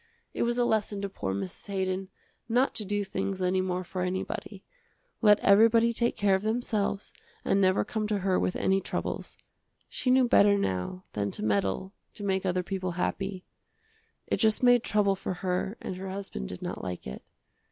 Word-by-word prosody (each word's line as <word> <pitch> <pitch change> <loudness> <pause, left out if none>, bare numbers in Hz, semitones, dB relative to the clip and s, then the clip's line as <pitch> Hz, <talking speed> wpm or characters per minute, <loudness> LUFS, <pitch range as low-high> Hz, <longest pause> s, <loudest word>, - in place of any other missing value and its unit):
It - - -3
was 240 +1 +1
a 245 - +3
lesson 210 -3 0
to 200 - -2
poor 95 - -4
Mrs. 95 - -5
Haydon 190 -1 -2 0.4
not 250 +4 +2
to 215 - -3
do 205 +1 0
things 195 0 -3
any 185 0 +1
more 185 0 -2
for 185 +1 -5
anybody. 185 +1 -4 0.6
Let 210 -2 +6
everybody 230 +3 +5
take 235 +1 +1
care 205 -3 +3
of 190 - +2
themselves 215 -2 -1 0.3
and 195 - +3
never 185 +1 +3
come 215 -1 -2
to 210 -1 0
her 190 -1 +1
with 180 - 0
any 195 0 +2
troubles; - - -4 0.5
she 255 - -2
knew 255 0 +5
better 200 -3 +5
now 140 - -2
than 100 -1 -1
to - - -4
meddle 100 - 0 0.2
to 205 - -7
make 190 -1 0
other 180 0 0
people 185 -1 -3
happy. 185 +1 -3 0.8
It - - 0
just 220 +1 +2
made 245 -1 +6
trouble 200 -2 +2
for 190 -1 -4
her 185 +3 -2
and 185 - -5
her 190 +1 -6
husband 190 - -5
did - - -6
not - - -4
like 90 -1 -5
it. 65 - -7
195 Hz, 185 wpm, -28 LUFS, 185-210 Hz, 0.8 s, Let